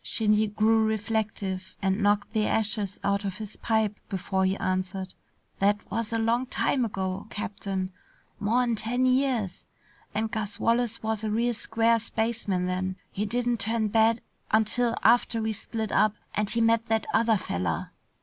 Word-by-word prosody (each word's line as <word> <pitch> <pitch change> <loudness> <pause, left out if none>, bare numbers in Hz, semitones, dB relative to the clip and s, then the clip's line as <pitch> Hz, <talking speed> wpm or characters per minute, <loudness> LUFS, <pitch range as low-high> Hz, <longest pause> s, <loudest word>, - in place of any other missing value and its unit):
Shinny 215 -1 +2
grew 220 +2 +3
reflective 215 -3 -2
and 195 +1 0
knocked 205 0 +2
the 215 -1 +2
ashes 210 -2 0
out 200 +1 +1
of 195 -2 -3
his 215 -2 -8
pipe 220 -2 0
before 190 -1 0
he 190 +1 +1
answered. 185 0 -2 0.5
"That 205 +1 +4
was 225 +1 -2
a 230 - +1
long 230 +3 +1
time 255 +1 +1
ago, 195 -2 -3
Captain. 195 -2 -3 0.5
More'n 235 +3 +2
ten 245 +4 0
years. 255 -7 +1 0.5
And 220 +1 0
Gus 210 -1 -3
Wallace 230 -1 +1
was 220 -1 -1
a 215 - -1
real 235 +3 +1
square 230 +1 +2
spaceman 220 -4 -1
then. 185 +1 -1 0.2
He 210 +2 -2
didn't 240 +1 0
turn 220 +1 0
bad 225 +2 +3 0.3
until 230 +2 +2
after 235 0 +4
we 220 0 -1
split 220 0 -4
up 215 +1 +3 0.2
and 210 -1 0
he 230 - 0
met 225 0 +3
that 225 -1 +1
other 225 -1 +4
feller." 85 - -2
215 Hz, 160 wpm, -27 LUFS, 200-230 Hz, 0.5 s, That